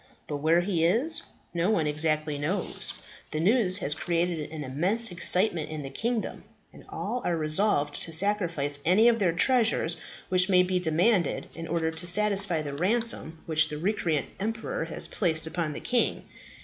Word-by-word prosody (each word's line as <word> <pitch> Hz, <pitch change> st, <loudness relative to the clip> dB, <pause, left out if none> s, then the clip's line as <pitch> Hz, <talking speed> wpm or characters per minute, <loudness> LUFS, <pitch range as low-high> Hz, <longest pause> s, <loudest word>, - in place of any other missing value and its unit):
But 145 Hz, -, -5 dB
where 160 Hz, +4 st, +2 dB
he 175 Hz, -3 st, -1 dB
is, 250 Hz, -, +5 dB, 0.3 s
no 170 Hz, +3 st, 0 dB
one 170 Hz, -8 st, +1 dB
exactly 150 Hz, 0 st, +1 dB
knows. 180 Hz, +6 st, -3 dB, 0.3 s
The 155 Hz, -, -4 dB
news 195 Hz, +1 st, +2 dB
has 150 Hz, -7 st, 0 dB
created 170 Hz, -2 st, -2 dB
an 155 Hz, -1 st, -7 dB
immense 180 Hz, -, +2 dB
excitement 175 Hz, -1 st, +2 dB
in 155 Hz, -2 st, -6 dB
the 135 Hz, -, -8 dB
kingdom, 235 Hz, -1 st, -3 dB, 0.3 s
and -, -, -15 dB
all 250 Hz, -, -4 dB
are 170 Hz, -, -1 dB
resolved 155 Hz, -1 st, 0 dB
to 165 Hz, -, -3 dB
sacrifice 165 Hz, -6 st, +2 dB
any 195 Hz, +7 st, +4 dB
of 235 Hz, -1 st, +3 dB
their 185 Hz, -4 st, +2 dB
treasures 220 Hz, -3 st, +1 dB, 0.3 s
which 185 Hz, +1 st, +3 dB
may 180 Hz, -1 st, +5 dB
be 180 Hz, 0 st, -1 dB
demanded 180 Hz, +4 st, 0 dB
in 165 Hz, 0 st, -8 dB
order 160 Hz, 0 st, -1 dB
to 160 Hz, +2 st, -3 dB
satisfy 195 Hz, -3 st, +2 dB
the 145 Hz, -1 st, -6 dB
ransom 185 Hz, -1 st, -1 dB
which 160 Hz, -1 st, +2 dB
the 150 Hz, -, -6 dB
recreant 165 Hz, -5 st, -1 dB
emperor 225 Hz, -, -4 dB
has -, -, -1 dB
placed 160 Hz, -5 st, -1 dB
upon 160 Hz, -1 st, -3 dB
the -, -, -6 dB
king. 245 Hz, -1 st, -1 dB
175 Hz, 170 wpm, -26 LUFS, 155-205 Hz, 0.3 s, is